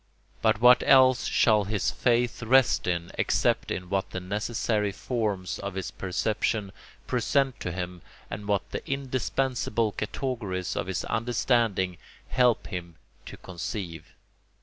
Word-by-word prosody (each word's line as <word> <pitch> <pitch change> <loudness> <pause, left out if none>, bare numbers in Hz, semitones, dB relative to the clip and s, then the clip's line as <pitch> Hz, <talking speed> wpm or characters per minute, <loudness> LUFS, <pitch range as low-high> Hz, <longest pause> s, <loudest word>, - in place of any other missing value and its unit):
But 105 - +3
what 125 +1 +7
else 130 -2 +5
shall 105 -3 +3
his 105 -1 0
faith 120 0 +1
rest 130 -1 +3
in 85 -1 -1
except - - +1
in 90 - -3
what 95 +1 -1
the - - -4
necessary 105 +2 -1
forms 105 -4 -2
of 100 -1 -5
his 95 -2 -4
perception 105 +2 -1 0.3
present 130 +2 +1
to 90 - -3
him 90 0 -5 0.3
and 105 - -7
what 100 -2 0
the - - -4
indispensable 130 -4 -1
categories 105 -5 -3
of - - -2
his 95 -2 -2
understanding 115 -5 0 0.3
help 125 -2 +3
him 85 -4 -6 0.3
to - - -9
conceive? 85 -2 -6
105 Hz, 130 wpm, -27 LUFS, 95-120 Hz, 0.3 s, what